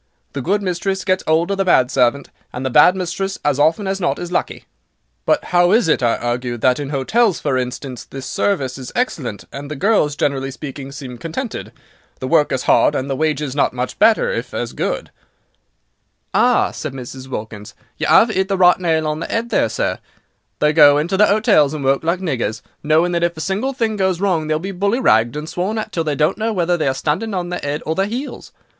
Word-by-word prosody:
The 140 Hz, -, -3 dB
good 200 Hz, +8 st, 0 dB
mistress 190 Hz, +1 st, -2 dB
gets 185 Hz, 0 st, +1 dB
'old 165 Hz, +4 st, +2 dB
of 195 Hz, -, -2 dB
the -, -, +3 dB
bad 130 Hz, -8 st, +3 dB
servant, 130 Hz, +2 st, +1 dB, 0.2 s
and 125 Hz, +2 st, -5 dB
the 130 Hz, -, -1 dB
bad 150 Hz, +8 st, +6 dB
mistress, 190 Hz, +1 st, -3 dB
as 145 Hz, -1 st, +1 dB
often 160 Hz, +7 st, +2 dB
as 195 Hz, 0 st, -2 dB
not 175 Hz, -, 0 dB
is 175 Hz, 0 st, -6 dB
lucky." -, -, -2 dB, 0.6 s
"But 300 Hz, -, +2 dB
how 175 Hz, 0 st, +4 dB
is 225 Hz, -5 st, +3 dB
it," 150 Hz, -, +2 dB
I 120 Hz, -2 st, +2 dB
argued, 120 Hz, 0 st, -3 dB
"that 130 Hz, +2 st, +3 dB
in 145 Hz, -2 st, -4 dB
hotels, 185 Hz, -, +1 dB
for 140 Hz, -3 st, -1 dB
instance, 125 Hz, 0 st, -4 dB
the 135 Hz, -1 st, -9 dB
service 135 Hz, -4 st, -1 dB
is 130 Hz, -, -8 dB
excellent, 145 Hz, -, -2 dB
and 140 Hz, +1 st, -7 dB
the 150 Hz, -, -4 dB
girls, 150 Hz, -3 st, +2 dB
generally 135 Hz, -2 st, -1 dB
speaking, 140 Hz, 0 st, -8 dB
seem 130 Hz, -4 st, -8 dB
contented? 185 Hz, -, -5 dB, 0.5 s
The 130 Hz, -, -4 dB
work 155 Hz, 0 st, +3 dB
is 130 Hz, -, -1 dB
hard, 145 Hz, -, +3 dB
and 135 Hz, +1 st, -2 dB
the -, -, 0 dB
wages 150 Hz, -2 st, -1 dB
not 145 Hz, -, +1 dB
much 125 Hz, 0 st, -4 dB
better, 230 Hz, -, +4 dB
if -, -, -4 dB
as -, -, -3 dB
good." -, -, -3 dB, 1.2 s
"Ah," 245 Hz, 0 st, +3 dB
said 155 Hz, -4 st, -6 dB
Mrs. 130 Hz, 0 st, -8 dB
Wilkins, 105 Hz, -4 st, -7 dB, 0.2 s
"you -, -, -2 dB
'ave 220 Hz, -1 st, +5 dB
'it 190 Hz, 0 st, 0 dB
the 195 Hz, -1 st, -1 dB
right 180 Hz, -1 st, +5 dB
nail 160 Hz, -3 st, +1 dB
on 150 Hz, 0 st, -2 dB
the 165 Hz, -, -4 dB
'ead, 230 Hz, +1 st, -2 dB
there, -, -, +2 dB
sir. -, -, -2 dB, 0.6 s
They 150 Hz, 0 st, +2 dB
go 145 Hz, -2 st, +7 dB
into 170 Hz, +6 st, 0 dB
the 210 Hz, +2 st, +5 dB
'otels 155 Hz, -9 st, +3 dB
and 140 Hz, -3 st, -4 dB
work 135 Hz, +2 st, +2 dB
like 170 Hz, +3 st, 0 dB
niggers, 120 Hz, -, -2 dB, 0.2 s
knowing 160 Hz, +4 st, +2 dB
that 170 Hz, -1 st, 0 dB
if 170 Hz, -1 st, 0 dB
a -, -, -6 dB
single 200 Hz, +10 st, -1 dB
thing 225 Hz, -4 st, -1 dB
goes 190 Hz, -3 st, 0 dB
wrong 180 Hz, -6 st, 0 dB
they 155 Hz, -, +1 dB
will -, -, -1 dB
be 190 Hz, +4 st, -5 dB
bully 200 Hz, +6 st, 0 dB
ragged 115 Hz, -, +3 dB
and 150 Hz, +1 st, -5 dB
sworn 185 Hz, +6 st, -2 dB
at 215 Hz, 0 st, -4 dB
till 165 Hz, -4 st, -1 dB
they 150 Hz, -2 st, -1 dB
don't 155 Hz, +8 st, +1 dB
know 225 Hz, +1 st, 0 dB
whether 175 Hz, -3 st, +1 dB
they 160 Hz, -4 st, -1 dB
are 135 Hz, -, 0 dB
standing 185 Hz, +10 st, -2 dB
on 175 Hz, -1 st, -3 dB
their 180 Hz, -, -4 dB
'ead 145 Hz, +1 st, -3 dB
or 160 Hz, -, 0 dB
their 195 Hz, +4 st, 0 dB
'eels. 255 Hz, +6 st, -6 dB
160 Hz, 225 wpm, -19 LUFS, 135-190 Hz, 1.2 s, go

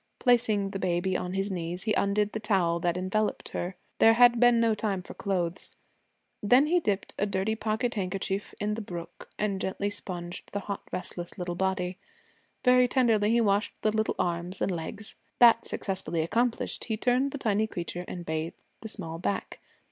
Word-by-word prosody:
Placing 225 Hz, -5 st, +2 dB
the 195 Hz, -, -4 dB
baby 180 Hz, +1 st, 0 dB
on 180 Hz, 0 st, -2 dB
his 195 Hz, +1 st, -1 dB
knees 175 Hz, 0 st, -3 dB
he 215 Hz, -, +1 dB
undid 205 Hz, +1 st, +1 dB
the 220 Hz, -, -3 dB
towel 185 Hz, -6 st, +1 dB
that 175 Hz, +1 st, 0 dB
enveloped 195 Hz, +4 st, -1 dB
her. 180 Hz, +2 st, -4 dB, 0.2 s
There 225 Hz, -, +7 dB
had 240 Hz, 0 st, +6 dB
been 245 Hz, -1 st, +6 dB
no 230 Hz, -1 st, +3 dB
time 205 Hz, -3 st, -2 dB
for -, -, -9 dB
clothes. 180 Hz, -3 st, -2 dB, 0.7 s
Then 250 Hz, +7 st, +5 dB
he 350 Hz, +4 st, +3 dB
dipped 205 Hz, -, -2 dB
a 205 Hz, -, +2 dB
dirty 195 Hz, +2 st, 0 dB
pocket 220 Hz, +2 st, -1 dB
handkerchief 195 Hz, 0 st, -3 dB
in 210 Hz, 0 st, 0 dB
the 225 Hz, -, -3 dB
brook 175 Hz, -4 st, -8 dB
and 200 Hz, -2 st, -1 dB
gently 200 Hz, +2 st, -2 dB
sponged 175 Hz, -3 st, -6 dB
the 205 Hz, -, -2 dB
hot, 200 Hz, 0 st, -4 dB
restless 175 Hz, 0 st, -5 dB
little 180 Hz, -1 st, -3 dB
body. 190 Hz, 0 st, -1 dB, 0.7 s
Very 250 Hz, 0 st, +6 dB
tenderly 230 Hz, -5 st, +3 dB
he 235 Hz, +1 st, +4 dB
washed 205 Hz, -1 st, +2 dB
the 215 Hz, -, +3 dB
little 220 Hz, 0 st, 0 dB
arms 175 Hz, +2 st, -2 dB
and -, -, 0 dB
legs. 185 Hz, +5 st, -5 dB, 0.2 s
That 235 Hz, -1 st, +6 dB
successfully 185 Hz, -4 st, -2 dB
accomplished, 230 Hz, +8 st, 0 dB
he 220 Hz, -2 st, -2 dB
turned 250 Hz, +4 st, +2 dB
the 285 Hz, -, -5 dB
tiny 220 Hz, -4 st, +1 dB
creature 175 Hz, -2 st, -4 dB
and 175 Hz, -1 st, -6 dB
bathed 160 Hz, +1 st, -3 dB, 0.2 s
the 220 Hz, -, -6 dB
small 165 Hz, -6 st, -5 dB
back. 100 Hz, -, -3 dB
200 Hz, 180 wpm, -28 LUFS, 180-220 Hz, 0.7 s, There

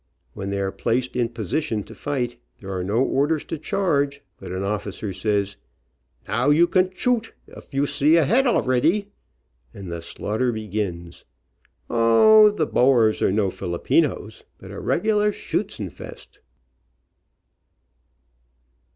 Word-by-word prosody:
When 100 Hz, -, -5 dB
they 100 Hz, 0 st, -2 dB
are 95 Hz, -1 st, -1 dB
placed 125 Hz, +5 st, -1 dB
in 120 Hz, -2 st, 0 dB
posi 115 Hz, -, -2 dB
tion 110 Hz, -8 st, -3 dB
to -, -, -13 dB
fight, 125 Hz, -4 st, -3 dB, 0.2 s
there 95 Hz, -1 st, -7 dB
are 90 Hz, -, -2 dB
no 105 Hz, +7 st, +1 dB
orders 145 Hz, +3 st, +1 dB
to 160 Hz, -, -6 dB
charge, 145 Hz, -5 st, 0 dB, 0.2 s
but -, -, -8 dB
an 95 Hz, +1 st, -3 dB
officer 100 Hz, 0 st, -3 dB
says, 100 Hz, 0 st, -1 dB, 0.7 s
"Now, 120 Hz, +8 st, +1 dB
you 155 Hz, +4 st, +5 dB
can 185 Hz, +1 st, +2 dB
choot, 225 Hz, +4 st, -1 dB, 0.2 s
of -, -, -13 dB
you 140 Hz, 0 st, +1 dB
see 145 Hz, +2 st, +3 dB
a 165 Hz, -3 st, +4 dB
head 250 Hz, -, +3 dB
alreddy," 175 Hz, -, +1 dB, 0.7 s
and 95 Hz, -3 st, -8 dB
the 85 Hz, 0 st, -5 dB
slaughter 110 Hz, +8 st, -2 dB
begins. 100 Hz, -6 st, -5 dB, 0.6 s
O, 210 Hz, -, +6 dB
the 205 Hz, -7 st, -1 dB
Boers 120 Hz, -6 st, +3 dB
are -, -, +3 dB
no 100 Hz, -1 st, +1 dB
Filipinos, 85 Hz, -2 st, -1 dB
but -, -, -12 dB
a -, -, -7 dB
regular 210 Hz, +2 st, +1 dB
schuetzenfest. -, -, -6 dB
125 Hz, 135 wpm, -23 LUFS, 100-160 Hz, 0.7 s, O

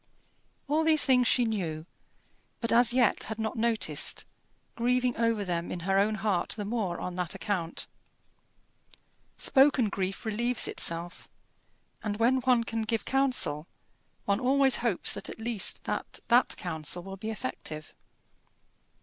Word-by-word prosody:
All 305 Hz, +3 st, +1 dB
these 315 Hz, -1 st, +4 dB
things 250 Hz, -3 st, +4 dB
she 245 Hz, 0 st, +3 dB
knew, 170 Hz, -8 st, -3 dB, 0.7 s
but 230 Hz, -, -1 dB
as 240 Hz, 0 st, +5 dB
yet 245 Hz, -3 st, +2 dB
had 220 Hz, 0 st, -5 dB
not 220 Hz, +2 st, -3 dB
noticed, 230 Hz, -1 st, 0 dB, 0.5 s
grieving 245 Hz, +1 st, +1 dB
over 230 Hz, -3 st, 0 dB
them 175 Hz, -1 st, -3 dB
in 175 Hz, -, -5 dB
her 195 Hz, +2 st, +1 dB
own 210 Hz, +2 st, +2 dB
heart 195 Hz, -4 st, -1 dB
the 205 Hz, -, -3 dB
more 200 Hz, -5 st, -2 dB
on 180 Hz, -, -4 dB
that 180 Hz, -3 st, -3 dB
account. 175 Hz, -5 st, -3 dB, 1.5 s
Spoken 270 Hz, -5 st, +4 dB
grief 195 Hz, +2 st, -3 dB
relieves 235 Hz, +2 st, 0 dB
itself; 170 Hz, +1 st, -1 dB, 0.7 s
and 210 Hz, -2 st, -2 dB
when 240 Hz, +4 st, +3 dB
one 250 Hz, -2 st, +3 dB
can 225 Hz, -1 st, -3 dB
give 225 Hz, 0 st, -2 dB
counsel, 255 Hz, -, +1 dB, 0.6 s
one 200 Hz, +1 st, +1 dB
always 265 Hz, +1 st, +4 dB
hopes 235 Hz, -7 st, 0 dB
at -, -, -5 dB
least 225 Hz, -2 st, -1 dB
that -, -, -3 dB
that 245 Hz, +1 st, +3 dB
counsel 170 Hz, 0 st, -3 dB
will 195 Hz, +1 st, -7 dB
be 215 Hz, +3 st, -5 dB
effective. 155 Hz, -5 st, -6 dB
220 Hz, 140 wpm, -28 LUFS, 185-245 Hz, 1.5 s, as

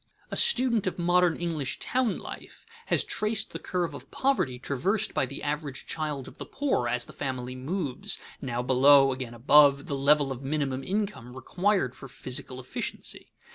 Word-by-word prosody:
A -, -, -2 dB
student 250 Hz, -, +3 dB
of 185 Hz, -, -2 dB
modern 175 Hz, -1 st, +3 dB
English 160 Hz, -6 st, -3 dB
town 250 Hz, -5 st, 0 dB
life -, -, -10 dB, 0.2 s
has -, -, +2 dB
traced 215 Hz, 0 st, -1 dB
the -, -, -4 dB
curve 180 Hz, -2 st, -2 dB
of -, -, -10 dB
poverty 260 Hz, -, 0 dB
traversed 165 Hz, -, -1 dB
by 135 Hz, -, +1 dB
the 140 Hz, -, -8 dB
average 145 Hz, -2 st, -3 dB
child 150 Hz, -4 st, -3 dB
of -, -, -13 dB
the -, -, -5 dB
poor, 270 Hz, -, 0 dB
as 120 Hz, 0 st, -1 dB
the -, -, -12 dB
family 130 Hz, -2 st, -4 dB
moves, 140 Hz, +1 st, -2 dB, 0.2 s
now 125 Hz, -2 st, -2 dB
below, 135 Hz, +1 st, +6 dB
again 125 Hz, -2 st, -6 dB
above, 140 Hz, +3 st, +5 dB
the 140 Hz, -, -3 dB
level 140 Hz, 0 st, +3 dB
of 130 Hz, -1 st, -5 dB
minimum 135 Hz, -2 st, -2 dB
income 195 Hz, -, -3 dB
required 180 Hz, -, 0 dB
for 135 Hz, -, -10 dB
physical 130 Hz, 0 st, -2 dB
efficiency. 130 Hz, -, -6 dB
140 Hz, 170 wpm, -28 LUFS, 130-180 Hz, 0.2 s, below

